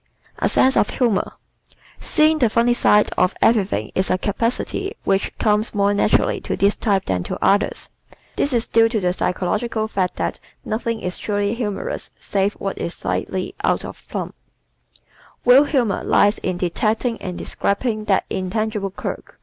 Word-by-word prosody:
A - - +1
Sense 265 +1 +3
of - - +3
Humor 235 -7 0 0.4
¶ - - -36 0.3
Seeing 310 0 +3
the 240 -5 +3
funny 235 +2 +3
side 210 -3 +3
of 185 - +2
everything 210 -4 +2
is 185 - 0
a 185 - +2
capacity 235 - -2
which 195 0 +1
comes 215 0 +1
more 200 0 +3
naturally 205 - +2
to - - -3
this 200 +1 +3
type 200 -4 0
than 90 -1 -1
to - - -4
others. 200 - +1 0.4
This 285 - 0
is 235 -2 +1
due 225 0 +4
to 225 -2 0
the 180 -2 0
psychological 215 +5 -1
fact 190 -4 -1
that - - -3 0.3
nothing 230 +1 -2
is 180 0 -4
truly 205 0 -1
humorous 215 -4 -4
save 200 +1 0
what 195 - -4
is 170 - -3
slightly 185 -1 -3
"out - - +1
of - - -11
plumb." - - -4 1.1
Real 255 +4 +7
humor 240 -10 0
lies 205 +1 +3
in 185 -1 -2
detecting 215 +7 -1
and 180 -1 -5
describing 215 +1 -1
that 195 -2 +2
intangible 205 +2 -2
quirk. 190 - -7
210 Hz, 165 wpm, -21 LUFS, 195-230 Hz, 1.1 s, Real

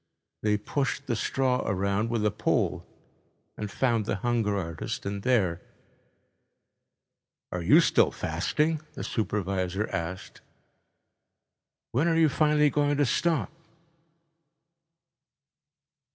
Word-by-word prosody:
They 105 -1 +2
pushed 135 +6 -2
the 120 - -1
straw 125 +3 0
around 100 +2 0
with 115 -2 0
a 105 - +3
pole - - 0 0.7
and 105 -1 -5
found 115 -1 0
the - - 0
hunger 110 -1 0
artist 85 -4 -4
in 100 0 -3
there. 100 -9 +1 1.9
"Are 90 - -3
you 85 - +6
still - - +4
fasting?" 155 0 -1
the - - -5
supervisor 100 -2 -1
asked. 85 +3 -5 1.5
"When 140 +8 +1
are 165 - +2
you 160 -2 +5
finally 150 0 +3
going 145 0 +1
to 145 - +3
stop?" 165 +5 0
110 Hz, 110 wpm, -27 LUFS, 100-140 Hz, 1.9 s, you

